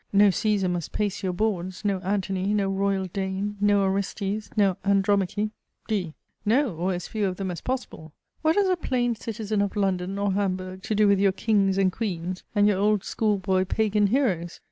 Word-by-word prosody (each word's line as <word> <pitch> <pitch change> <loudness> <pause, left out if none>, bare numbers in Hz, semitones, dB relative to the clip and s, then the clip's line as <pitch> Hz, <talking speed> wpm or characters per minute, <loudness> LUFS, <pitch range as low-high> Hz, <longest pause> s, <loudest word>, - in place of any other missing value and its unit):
No 205 0 +6
Caesar 205 -1 +1
must 175 -3 -3
pace 205 -2 -1
your 185 - -1
boards 185 -1 -2
no 200 -2 +1
Antony, 195 +1 -1
no 200 -2 +1
royal 195 0 0
Dane, 190 +2 -3
no 205 -1 +4
Orestes, 195 +2 -2
no 195 -3 +4
Andromache! 200 +1 +1 0.4
D. 185 -8 -2 0.3
No: 235 - +2
or 180 +4 -1
as 175 - -5
few 210 -2 -1
of 185 - -3
them 190 -2 -3
as 175 - -6
possible. 250 - -5 0.3
What 315 +1 +3
has 405 -1 +3
a 370 - +3
plain 245 -7 0
citizen 215 -2 -3
of 200 -1 -1
London, 190 -1 0
or 200 -1 0
Hamburg, 185 -1 -2
to 215 - -2
do 210 0 +4
with 200 -1 +4
your 195 -1 +4
kings 195 -2 +2
and 190 -1 +3
queens, 185 -3 -4
and 205 0 +5
your 200 -2 +2
old 210 -1 +2
school 215 -2 0
boy 190 0 +1
Pagan 210 +1 +1
heroes? 195 -9 0
200 Hz, 190 wpm, -25 LUFS, 185-210 Hz, 0.4 s, No